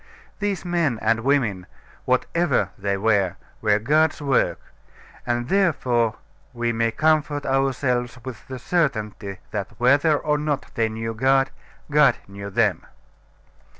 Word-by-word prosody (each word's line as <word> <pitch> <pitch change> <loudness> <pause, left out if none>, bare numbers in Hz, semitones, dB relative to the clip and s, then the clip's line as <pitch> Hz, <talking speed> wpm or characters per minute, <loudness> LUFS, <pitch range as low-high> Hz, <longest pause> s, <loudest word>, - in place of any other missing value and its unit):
These 205 -4 -2
men 170 -8 +1
and 115 +1 +2
women, 115 -8 0 0.4
whatever 140 +4 +1
they 100 -1 -1
were, 100 -3 +2 0.3
were 105 -1 +3
God's 150 +9 +2
work; 140 -4 +1 0.7
and 120 0 -1
therefore 125 - +2 0.4
we 120 0 0
may 115 0 +1
comfort 150 +2 +1
ourselves 130 -2 0
with 125 -3 -8
the 130 - -6
certainty 110 - -1
that, 100 -2 -4
whether 145 +5 +4
or 150 0 0
not 150 -2 -2
they 115 -1 +1
knew 115 +1 -4
God, 135 +4 +2 0.4
God 150 -2 +5
knew 100 0 -8
them. 95 - +1
125 Hz, 125 wpm, -23 LUFS, 110-145 Hz, 0.7 s, God